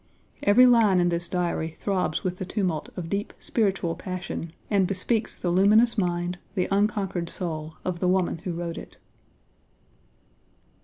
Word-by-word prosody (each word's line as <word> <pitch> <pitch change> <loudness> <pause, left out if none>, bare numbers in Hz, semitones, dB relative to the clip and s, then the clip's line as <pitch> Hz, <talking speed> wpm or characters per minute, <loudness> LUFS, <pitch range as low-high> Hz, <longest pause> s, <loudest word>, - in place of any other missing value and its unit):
Every 220 +5 +6
line 225 -6 +5
in 175 0 +3
this 170 0 -1
Diary 170 -3 -2
throbs 185 -6 -1
with 180 -1 -2
the - - -4
tumult 185 -5 -2
of 175 -2 -4
deep 200 +4 -3
spiritual 195 -6 0
passion, 180 -3 -5 0.2
and 195 -3 +2
bespeaks 210 +4 -1
the 175 - -1
luminous 210 +6 +5
mind, 175 -3 -1 0.2
the 185 - +1
unconquered 195 -4 0
soul, 160 -3 -2
of 180 -2 -2
the 180 - +1
woman 180 -2 +1
who 180 +1 -4
wrote 170 0 -4
it. - - -13
185 Hz, 150 wpm, -26 LUFS, 175-200 Hz, 0.2 s, Every